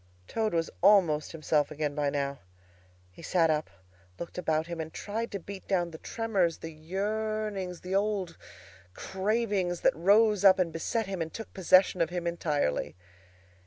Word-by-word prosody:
Toad 220 -1 -1
was 165 0 0
almost 175 -6 +4
himself 155 -2 0
again 150 -1 -2
by 145 -1 0
now. 140 -1 -2 0.7
He 90 - -14
sat 165 -1 +2
up, 155 0 -1 0.5
looked 170 +1 -6
about 160 -2 0
him, 170 -1 -5
and 160 0 -6
tried 225 +6 -4
to 200 - -4
beat 195 +2 -9
down 175 -3 0
the 160 - -10
tremors, 200 -8 0
the 165 - -7
yearnings, 200 +2 -3
the 180 +1 -5
old 195 -3 0 0.6
cravings 195 -3 -1
that - - +3
rose 205 +4 +4
up 190 -1 +8
and 175 -4 0
beset 225 +7 -1
him 190 -3 -4
and 160 0 -3
took 225 - -8
possession 185 -1 +4
of 165 - +2
him 175 -1 -4
entirely. 150 - -1
180 Hz, 160 wpm, -29 LUFS, 160-205 Hz, 0.7 s, up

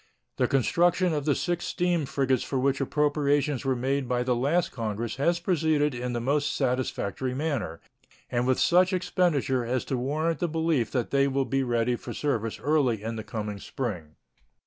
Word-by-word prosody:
The - - +2
construction 175 +6 +2
of 145 -2 -2
the 145 -3 +2
six 175 -1 -1
steam 175 -4 0
frigates 130 -3 +1
for 135 - -3
which 135 +1 +1
appropriations 145 -1 +1
were 135 -1 +1
made 130 +1 -1
by 125 -1 +1
the 125 0 +1
last 145 +8 +1
Congress 115 -1 -3
has 170 +5 +2
proceeded 155 -5 +1
in 125 0 -3
the 120 - -1
most 140 +4 0
satisfactory 125 -2 -1
manner 135 - -2 0.5
and 120 +1 -1
with 130 - +2
such 185 +2 +4
expedition 170 -8 +1
as 120 +1 -2
to 130 - -2
warrant 155 +6 -1
the 175 - 0
belief 160 -6 +1
that 125 -3 -2
they 140 0 +3
will 135 0 0
be 135 +1 0
ready 120 -1 +1
for - - -7
service 115 -7 -1
early 135 -7 +1
in 115 +1 -3
the 110 - -5
coming 105 -3 -5
spring. 95 - -5
135 Hz, 180 wpm, -27 LUFS, 120-155 Hz, 0.5 s, such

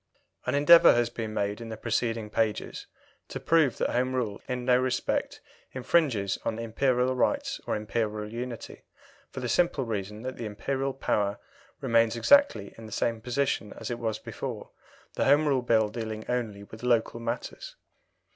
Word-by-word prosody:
An - - +1
endeavour 165 +3 +8
has 120 0 +1
been 110 -2 -4
made 105 +1 -2
in 115 - -7
the 110 - -6
preceding 115 -1 -1
pages 110 -1 -1 0.4
to - - -6
prove 160 -6 +3
that - - 0
Home 130 +1 0
Rule 110 -6 -2
in 125 -1 -3
no 125 -1 +5
respect 130 0 -1 0.3
infringes 125 - +1
on 110 - -2
Imperial 125 +2 +1
rights 280 - 0
or - - 0
Imperial 105 0 -3
unity, 120 -1 -6 0.5
for 130 - -7
the 125 - -2
simple 150 -2 +1
reason 105 0 -4
that 130 0 -5
the 115 - -4
Imperial 135 +6 -2
power 100 -6 0 0.4
remains 115 0 +3
exactly 280 - +4
in 110 - -9
the - - -12
same 115 +2 -1
position 125 -3 -1
as 115 +1 -6
it 120 - -3
was 110 -2 -2
before, 115 +1 -7 0.4
the - - 0
Home 150 +2 +4
Rule 135 -3 +2
Bill 115 -3 +3
dealing 110 -1 -5
only 115 -5 -2
with 110 +2 -12
Local 120 -1 +1
matters. 115 +1 -5
115 Hz, 165 wpm, -28 LUFS, 110-130 Hz, 0.5 s, endeavour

